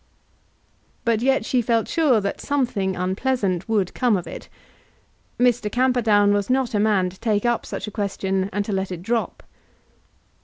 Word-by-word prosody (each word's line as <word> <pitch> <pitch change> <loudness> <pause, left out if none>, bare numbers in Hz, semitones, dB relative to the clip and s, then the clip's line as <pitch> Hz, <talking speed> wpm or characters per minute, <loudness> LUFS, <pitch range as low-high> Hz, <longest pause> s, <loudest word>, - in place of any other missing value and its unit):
But 230 -2 +2
yet 265 -3 +2
she 250 0 +1
felt 230 -1 +1
sure 295 -9 +3
that 200 - -3
something 235 -9 -1
unpleasant 190 0 -1
would 205 -5 0
come 245 -5 +2
of 180 - -5
it. - - -9 0.9
Mr. 245 -4 +2
Camperdown 230 -5 +3
was 205 +1 -1
not 255 -1 +1
a 210 - +1
man 200 -4 +2
to 190 - -17
take 215 -1 0
up 240 -1 0
such - - -5
a 210 - -7
question 195 -2 -2
and 205 +1 -2
to 215 - -4
let 190 -1 -2
it 175 -1 -6
drop. 230 +3 -2
215 Hz, 165 wpm, -22 LUFS, 195-245 Hz, 0.9 s, sure